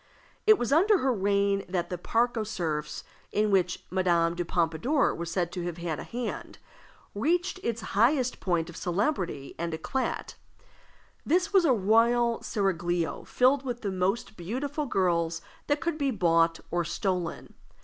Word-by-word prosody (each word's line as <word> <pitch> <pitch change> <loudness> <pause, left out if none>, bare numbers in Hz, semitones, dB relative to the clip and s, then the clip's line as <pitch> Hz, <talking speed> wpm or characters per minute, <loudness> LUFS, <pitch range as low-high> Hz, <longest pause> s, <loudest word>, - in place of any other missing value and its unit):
It 435 -1 +8
was 245 -1 0
under 395 +7 +5
her 265 -6 +1
reign 200 -1 +1
that 180 -1 -2
the 180 - -2
Parc 235 +6 +1
aux 220 - -1
Cerfs 160 -8 -3 0.3
(in 210 0 +1
which 185 -2 +1
Madame 170 -3 +2
de 175 0 -2
Pompadour 170 - +1
was 170 0 -5
said 175 0 -1
to 180 - -4
have 175 -1 -4
had 170 -3 -3
a - - -5
hand), 240 0 -5 0.6
reached 345 - 0
its 230 -8 -2
highest 250 +4 +2
point 170 -3 0
of 170 - -10
celebrity 180 - -2
and 170 -1 -2
eclat. 260 +11 -3 0.9
This 360 +5 +1
was 380 -3 +5
a 275 - +5
royal 230 +3 +3
seraglio 175 -4 -1
filled 260 +2 +3
with 245 -3 -4
the 200 - -2
most 190 +4 -1
beautiful 275 - -3
girls 170 -6 +1 0.3
that 290 0 +1
could 335 -2 -2
be 280 -1 +1
bought 165 -6 +2
or 175 0 +1
stolen. 180 0 -3
200 Hz, 160 wpm, -28 LUFS, 170-250 Hz, 0.9 s, It